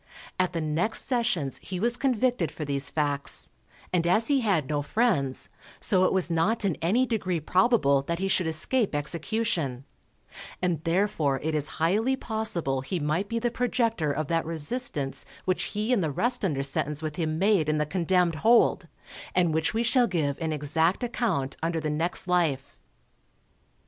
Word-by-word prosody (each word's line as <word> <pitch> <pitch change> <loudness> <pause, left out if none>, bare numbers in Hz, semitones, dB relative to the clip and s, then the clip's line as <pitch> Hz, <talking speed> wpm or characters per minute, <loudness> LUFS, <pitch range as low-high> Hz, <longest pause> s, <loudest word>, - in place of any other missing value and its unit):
At 185 -1 +1
the 165 - -2
next 160 +8 +1
sessions 230 - 0
he 185 -2 -6
was 235 +4 +3
convicted 245 - 0
for 150 - -6
these 140 0 +2
facts, 145 -2 +3 0.4
and 170 -1 +1
as 215 +8 +2
he 280 -1 +3
had 185 - +1
no 145 0 -1
friends, 145 - 0 0.3
so 185 -2 +2
it - - +2
was 190 -3 +2
not 200 +7 +1
in 190 - +1
any 215 +11 +2
degree 195 -8 -2
probable 170 - +2
that 170 +5 -3
he 195 +2 -2
should 185 -3 +1
escape 190 - +1
execution; 155 - -2 0.7
and 175 -4 -1
therefore 165 -6 0
it 160 +1 -1
is 150 -1 +1
highly 210 +11 +1
possible 220 - -1
he 170 +7 -3
might 160 +7 -1
be 230 - -2
the 240 +1 -1
projector 230 - 0
of 155 +2 -2
that 165 +1 0
resistance 160 - -1 0.2
which 185 -1 0
he 215 +4 -2
and 225 - +2
the 160 - 0
rest 240 - -1
under 145 -8 0
sentence 145 +2 -1
with 155 -1 -4
him 160 -2 -2
made 190 -4 +2
in 155 - +1
the 150 - 0
condemned 180 +1 +1
hold, 235 +1 +3 0.5
and 175 -3 +2
which 160 +6 0
we 230 - +1
shall 245 +1 +3
give 155 -7 -1
an 160 -2 -2
exact 160 - +1
account 215 - -2
under 165 0 -1
the 155 -1 -3
next 170 +4 +1
life. 165 -7 0
170 Hz, 175 wpm, -26 LUFS, 150-220 Hz, 0.7 s, was